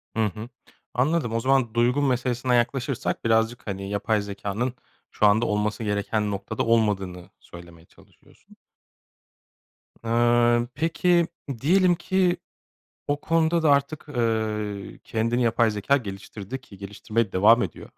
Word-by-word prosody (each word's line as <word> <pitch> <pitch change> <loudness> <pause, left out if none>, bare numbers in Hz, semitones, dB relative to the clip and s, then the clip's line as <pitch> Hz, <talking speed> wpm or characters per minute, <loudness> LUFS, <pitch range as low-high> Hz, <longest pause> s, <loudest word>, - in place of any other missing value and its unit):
Hı 110 -1 +2
hı, 105 +3 -5 0.4
anladım. 130 -2 0
O 115 - +1
zaman 130 -2 +1
duygu 120 +4 +2
meselesinden 125 -2 0
yaklaşırsak 120 +1 -1
birazcık, 115 +1 +1
hani, 100 -1 -4
yapay 105 +1 0
zekânın 100 +4 -3 0.4
şu - - +1
anda 105 +3 +4
olması 105 +1 -1
gereken 105 0 -1
noktada 100 +2 -3
olmadığını 100 -6 0
söylemeye 85 -1 -14
çalışıyorsun. - - -23 1.5
Iıı, 120 +1 +3
peki. 170 +2 +2 0.3
Diyelim 180 +4 +4
ki 185 0 +1 0.7
o 145 0 -1
konuda 165 0 +1
da 155 - +5
artık, 140 +2 0
ııı, 110 -5 -2
kendini 115 +2 0
yapay 115 -1 +2
zekâ 105 +7 +1
geliştirdi 100 +2 -7
ki 100 -6 -15
geliştirmeye 105 +2 -3
devam 110 +6 +5
ediyor. 90 - -7
115 Hz, 125 wpm, -25 LUFS, 105-130 Hz, 1.5 s, da